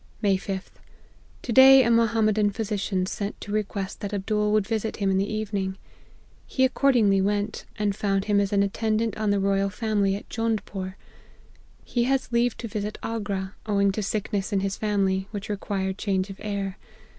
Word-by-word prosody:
" - - -31
May 200 -2 +4
5th. 190 0 -5 0.7
To 245 - -3
day 265 +2 +9
a 235 - +2
Mohammedan 215 -2 +3
physician 200 -3 -2
sent 200 +2 -4
to 205 - -7
request 200 -2 -3
that 205 0 -4
Abdool 210 +1 0
would 210 -2 +3
visit 220 0 -2
him 195 -2 +1
in 190 - +2
the 200 +2 -1
evening. 200 -3 -2 0.7
He 260 - +2
accordingly 240 -7 +3
went, 205 +2 -1
and 210 -2 0
found 195 -1 0
him 205 -1 +3
as 200 -1 0
an 200 -1 +3
attendant 220 +2 0
on 215 -1 -1
the 205 0 +2
Royal 195 0 +1
Family 205 -2 0
at 200 - -8
Jondpore. 210 -4 -3 0.9
He 240 -1 0
has 265 -1 0
leave 235 0 +2
to 235 - -5
visit 210 -1 -4
Agra, 205 -4 -3
owing 200 -1 +3
to 215 - -3
sickness 205 0 -2
in 195 -2 +1
his 195 0 -1
family, 195 -2 0
which 205 0 -6
required 195 -1 -2
change 195 -1 -1
of 195 - -10
air. 200 -2 -4
205 Hz, 180 wpm, -25 LUFS, 195-220 Hz, 0.9 s, day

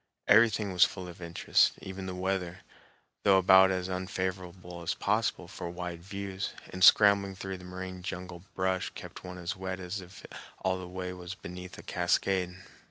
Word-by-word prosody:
Everything 105 -2 +5
was 90 - +6
full 95 -2 -1
of 90 0 -11
interest, 85 0 +3
even 95 0 -7
the 90 - -4
weather, 95 -1 -2 0.6
though 100 -2 +6
about 95 0 +7
as 90 -1 -1
unfavorable 90 -1 -4
as 85 - -1
possible 105 -3 0
for 85 -1 -6
wide 90 -1 -5
views, 100 +1 -5 0.2
and 90 0 -2
scrambling 100 -1 +7
through 95 0 -5
the 90 - -11
moraine 90 0 -7
jungle 90 -1 -6
brush 95 0 0
kept - - -9
one 90 0 -7
as 90 0 -3
wet 95 0 -4
as 95 +2 -4
if 90 +1 -13 0.4
all 95 0 +1
the 90 - -7
way 90 0 -5
was 90 0 -7
beneath 90 0 -9
a - - -10
cascade. 90 +1 0
95 Hz, 170 wpm, -30 LUFS, 90-95 Hz, 0.6 s, about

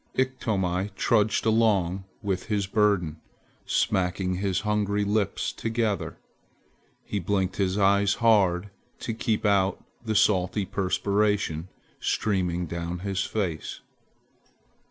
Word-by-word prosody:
Iktomi 100 -8 0
trudged 110 0 +2
along 100 -5 +2 0.2
with 95 -3 -1
his 105 -3 0
burden, 100 -6 +1 0.5
smacking 90 0 0
his 95 -1 0
hungry 105 -1 0
lips 105 -1 0
together. 115 -2 -2 0.9
He 105 - -3
blinked 95 0 -1
his 95 -1 0
eyes 100 0 +3
hard 100 -4 +3 0.3
to 115 - -3
keep 110 -1 -1
out 100 -1 +2 0.2
the 110 -2 -2
salty 100 -1 +2
perspiration 100 -3 0 0.3
streaming 90 -4 0
down 85 +1 -4
his 100 0 0
face. 90 -8 -3
100 Hz, 105 wpm, -26 LUFS, 90-105 Hz, 0.9 s, eyes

